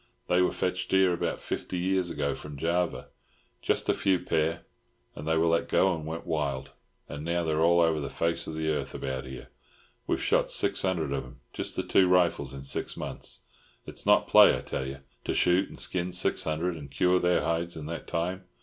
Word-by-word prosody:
"They 90 +1 +4
were 90 - +3
fetched 90 0 -2
here 95 -1 +4
about 85 - -2
fifty 90 - -4
years 95 0 0
ago 70 -3 -1
from 75 -1 -9
Java—just 85 +3 -3
a - - +4
few 95 -2 +2
pair, 80 -1 0 0.5
and 75 - -8
they 80 0 +2
were 80 - +3
let 85 0 +1
go 95 -1 +3
and 80 -2 -5
went 80 +1 -5
wild, 70 -4 -2 0.4
and 75 +1 -7
now 85 +1 0
they're 80 -1 0
all 85 +1 +5
over 80 -2 +2
the 70 - -4
face 85 0 -1
of 80 - -5
the 80 0 -1
earth 75 - -2
about 65 0 -4
here. 65 0 -9 0.6
We've - - 0
shot - - +2
six - - 0
hundred 85 -7 0
of 70 - -2
'em—just 65 -3 -7
the - - -1
two 95 - +4
rifles—in 80 -7 +1
six 70 - 0
months. - - -4 0.4
It's - - -8
not - - +5
play, - - +7
I - - -6
tell 65 - -4
you, 70 +1 -7 0.2
to - - -1
shoot 90 +2 +3
and - - -11
skin 90 0 -2
six 90 - +1
hundred 80 +2 -1
and 70 -2 -9
cure 90 +6 +2
their 90 0 +2
hides 85 0 -1
in 75 - -6
that 80 +1 -6
time. 90 +3 -2
85 Hz, 205 wpm, -28 LUFS, 75-90 Hz, 0.6 s, play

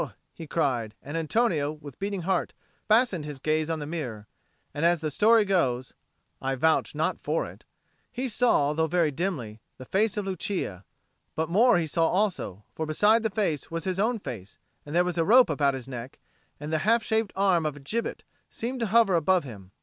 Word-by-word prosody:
he 165 - -9
cried; 125 -9 -1
and 145 +3 -7
Antonio, 165 -3 +1
with 150 -4 -12
beating 200 -2 -3
heart, 190 +1 0 0.3
fastened 215 -6 +3
his 150 -2 -6
gaze 155 +3 0
on 165 - -1
the 150 - -5
mirror. 130 -10 -5 0.5
And 145 - -3
as 170 0 +4
the 155 -1 -3
story 220 +6 +4
goes 130 -10 0 0.5
(I 135 0 -1
vouch 160 +5 +1
not - - 0
for - - -1
it) - - -12 0.5
he 255 +1 -3
saw, 215 - +2
though 160 +1 +1
very 165 -2 +2
dimly, 135 - -4 0.2
the 130 - -10
face 210 - +1
of 205 - -1
Lucia; 185 - -3 0.5
but 160 0 -1
more 225 +5 +5
he 170 - 0
saw 165 +1 +1
also; 180 - -1
for 160 - -4
beside 210 +9 +4
the 220 - 0
face 190 -9 -1
was 165 0 -4
his 185 -1 -2
own 230 +4 +1
face, 105 - -8 0.3
and 150 - -5
there 175 +1 +4
was 180 -1 -2
a - - +4
rope 240 +1 +6
about 140 -2 +1
his 130 -1 -7
neck, 125 0 -7 0.4
and 150 +2 -5
the 160 - +2
half 225 +6 +3
shaped 220 -2 0
arm 190 -4 +3
of 155 -2 -2
a - - -11
gibbet 220 +12 -3 0.3
seemed 250 +3 -4
to 230 - 0
hover 220 -1 +4
above 175 +2 +3
him. 100 -8 -11
165 Hz, 200 wpm, -27 LUFS, 145-205 Hz, 0.5 s, rope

